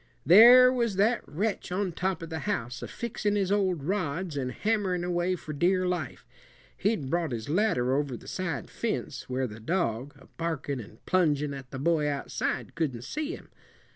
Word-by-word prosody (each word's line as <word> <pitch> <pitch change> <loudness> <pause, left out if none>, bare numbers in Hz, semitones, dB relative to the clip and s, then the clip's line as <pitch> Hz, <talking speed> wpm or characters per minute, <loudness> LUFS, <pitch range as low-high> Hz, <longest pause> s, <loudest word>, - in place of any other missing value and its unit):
"There 240 - +9
was 235 -5 0
that 215 +5 +3
wretch 195 +6 -2
on 185 0 -1
top 180 0 -2
of 165 - -8
the 160 - -3
house, 120 - -2
a - - -5
fixin' 215 -3 -2
his 195 -2 0
old 190 -7 +1
rods 175 -2 -2
and 130 -2 -2
hammerin' 200 -4 0
away 175 +1 0
for 155 -3 -7
dear 185 +5 +2
life. 180 -1 -3 0.5
He'd 200 -9 0
brought 170 -3 0
his 115 +1 -4
ladder 150 - +2
over 140 -4 -1
the - - -15
side 180 -6 -4
fence, - - -3
where 130 +1 0
the 110 -2 -7
dog, 135 -2 -1
a - - -17
barkin' 155 -5 -3
and 110 - -12
plungin' 150 -6 +2
at 135 -2 -8
the 130 - -6
boy 150 +1 +1
outside, 145 -1 -2
couldn't 135 -8 -2
see 310 - -3
him. - - -15
170 Hz, 180 wpm, -28 LUFS, 140-195 Hz, 0.5 s, There